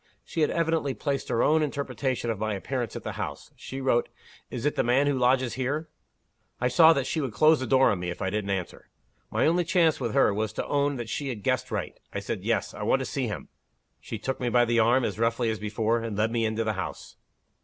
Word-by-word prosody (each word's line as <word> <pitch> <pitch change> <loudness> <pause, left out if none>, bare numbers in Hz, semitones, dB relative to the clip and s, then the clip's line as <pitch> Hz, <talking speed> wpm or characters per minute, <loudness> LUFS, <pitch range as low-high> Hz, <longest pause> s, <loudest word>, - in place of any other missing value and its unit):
She 165 - -3
had 150 - +3
evidently 160 -5 0
placed 140 -2 -2
her 115 - +2
own 155 +1 +4
interpretation 135 -4 -2
of 110 - -4
my 110 -1 -1
appearance 120 +3 -3
at - - -6
the - - -3
house. - - -6
She 135 - -7
wrote, 130 -3 +1 0.4
'Is 120 - -5
it 150 - +2
the - - +2
man 125 +4 +3
who 145 - +2
lodges 125 -1 +2
here?' 140 +5 -2 0.7
I 125 - +1
saw 160 +6 +7
that 140 -4 -1
she 160 - -1
would 130 -6 -3
close 155 +5 +5
the 130 - -3
door 130 0 +5
on 100 - -1
me 90 0 -3
if 85 - -5
I 95 -1 -1
didn't 105 -1 -2
answer. 95 -2 -4 0.4
My - - +1
only 175 +3 +3
chance 170 -2 +2
with - - -2
her 135 -7 +4
was 110 +1 -2
to - - -3
own 145 0 +1
that 120 -3 -5
she 140 +5 -3
had 110 -6 -5
guessed - - 0
right. - - -4
I - - -3
said - - -4
'Yes. - - 0
I - - -8
want - - +2
to - - -2
see - - -2
him.' - - -6 0.5
She 115 - -6
took 130 +5 -3
me 125 - 0
by 120 0 +4
the 120 0 +2
arm, 120 +3 +4
as - - -3
roughly 115 0 +1
as 110 - -4
before 110 +2 0
and 115 -3 -4
led 110 +2 +1
me 115 -1 +1
into 110 +1 -1
the 110 -1 0
house." 95 -2 -6
125 Hz, 250 wpm, -27 LUFS, 110-140 Hz, 0.7 s, saw